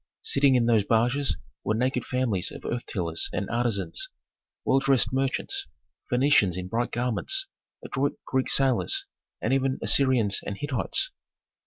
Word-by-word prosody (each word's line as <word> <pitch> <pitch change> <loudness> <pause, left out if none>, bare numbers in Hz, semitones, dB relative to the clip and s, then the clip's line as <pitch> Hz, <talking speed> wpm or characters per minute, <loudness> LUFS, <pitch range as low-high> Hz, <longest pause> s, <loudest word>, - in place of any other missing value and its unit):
Sitting 135 -1 +3
in 120 -2 +3
those 115 -3 +3
barges 120 +6 +1 0.3
were 110 - 0
naked 125 +1 0
families 120 -8 -1
of - - -10
earth 120 0 -3
tillers 85 -4 -1
and 100 - -2
artisans, 115 -8 0 0.6
well 135 - +3
dressed 135 -2 +2
merchants, 135 - -1 0.4
Phœnicians 125 -8 +3
in 90 0 -5
bright 120 +4 -1
garments, 125 - -1 0.4
adroit 140 +1 -2
Greek 130 0 0
sailors, 135 - +2 0.4
and - - +1
even 135 0 +1
Assyrians 125 -7 +3
and 100 - -5
Hittites. 145 - +1
125 Hz, 140 wpm, -26 LUFS, 110-135 Hz, 0.6 s, Sitting